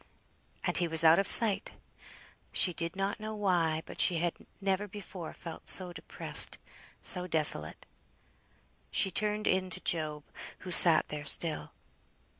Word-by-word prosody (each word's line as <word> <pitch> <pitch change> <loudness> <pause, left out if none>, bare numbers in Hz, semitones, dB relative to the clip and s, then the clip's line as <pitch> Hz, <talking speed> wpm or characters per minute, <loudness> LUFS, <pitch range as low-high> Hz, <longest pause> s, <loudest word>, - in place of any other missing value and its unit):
And - - -3
he 175 - -2
was 160 0 +6
out 160 +2 +3
of 195 - -2
sight! 215 -4 +6 0.8
She 180 - -2
did 165 +1 -4
not 195 +2 -5
know 215 0 -9
why, 170 -6 -3
but - - -8
she 175 - -1
had 170 +1 -4 0.3
never 195 +1 -4
before 190 -4 -11
felt 165 -2 -13
so 180 -2 +2
depressed, 160 - -2 0.5
so 180 0 +5
desolate. 160 -3 +1 1.0
She 190 - -2
turned 210 +3 -3
in 185 0 -2
to 185 - -3
Job, 155 -3 -5 0.4
who 185 - -10
sat 170 -2 +4
there 150 0 -9
still. 160 +1 +2
180 Hz, 145 wpm, -27 LUFS, 165-195 Hz, 1.0 s, was